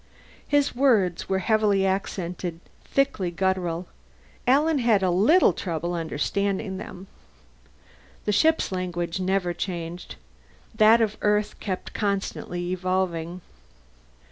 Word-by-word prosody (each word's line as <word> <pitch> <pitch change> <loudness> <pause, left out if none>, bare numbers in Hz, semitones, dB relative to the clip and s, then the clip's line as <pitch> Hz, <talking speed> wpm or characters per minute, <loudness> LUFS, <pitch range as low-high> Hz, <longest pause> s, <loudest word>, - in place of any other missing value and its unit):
His 290 -2 +2
words 220 -12 +2
were 190 - +2
heavily 205 0 +2
accented, 180 -3 -3 0.2
thickly 275 -10 0
guttural; 180 -1 -1 0.6
Alan 295 +4 +4
had 225 -5 +3
a 185 - +2
little 225 - +5
trouble 170 -1 -3
understanding 190 +5 -2
them. 190 -1 -9 1.2
The 210 - +1
ship's 320 +7 +3
language 175 -1 -3
never 185 -1 0
changed; 175 -1 -5 0.6
that 220 +1 +6
of 215 -1 0
Earth 210 0 +1
kept 185 -3 -5
constantly 195 -3 -2
evolving. 185 -2 -2
190 Hz, 105 wpm, -25 LUFS, 175-215 Hz, 1.2 s, that